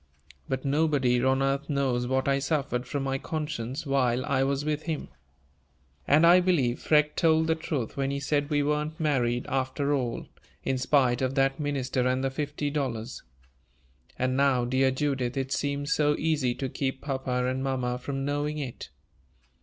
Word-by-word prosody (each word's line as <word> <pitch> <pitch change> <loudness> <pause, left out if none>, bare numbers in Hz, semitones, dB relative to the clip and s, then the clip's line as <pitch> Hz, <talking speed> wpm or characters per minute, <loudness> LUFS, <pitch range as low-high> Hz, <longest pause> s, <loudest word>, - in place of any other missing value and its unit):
But 130 +1 -2
nobody 135 -4 +2
on 130 +1 +2
earth 135 +2 -1
knows 130 -4 0
what 130 +1 0
I 140 0 +2
suffered 135 -3 -1
from 140 +2 -2
my 135 0 -1
conscience 150 -3 -4
while 130 -3 +1
I 140 -2 +1
was 140 +1 -1
with 150 0 -1
him! 160 -3 -3 1.0
And 150 +4 +5
I 175 +2 +8
believe 155 -10 +1
Freke 150 -1 +3
told 160 -1 +3
the 160 - +2
truth 150 -7 -3
when 135 0 0
he 140 0 -2
said 145 +1 0
we 145 -2 +2
weren't 150 +2 -1
married, 125 -6 +1
after 135 +2 -1
all, 125 -4 -2 0.4
in 130 - -1
spite 130 -2 +2
of 130 +1 -1
that 135 +1 +2
minister 135 -3 -1
and 130 +1 0
the 135 - 0
fifty 145 +1 -3
dollars. 130 -5 -3 1.0
And 130 0 0
now, 135 -3 +3
dear 130 +2 +2
Judith, 130 -2 -1
it 135 0 -2
seems 145 +3 -1
so 150 -1 +2
easy 145 -6 0
to 135 - -3
keep 130 0 -3
papa 130 -3 -2
and 130 +1 -1
mamma 125 -2 -1
from 135 +1 -4
knowing 145 +1 -1
it." 135 -5 -6
135 Hz, 170 wpm, -27 LUFS, 130-145 Hz, 1.0 s, I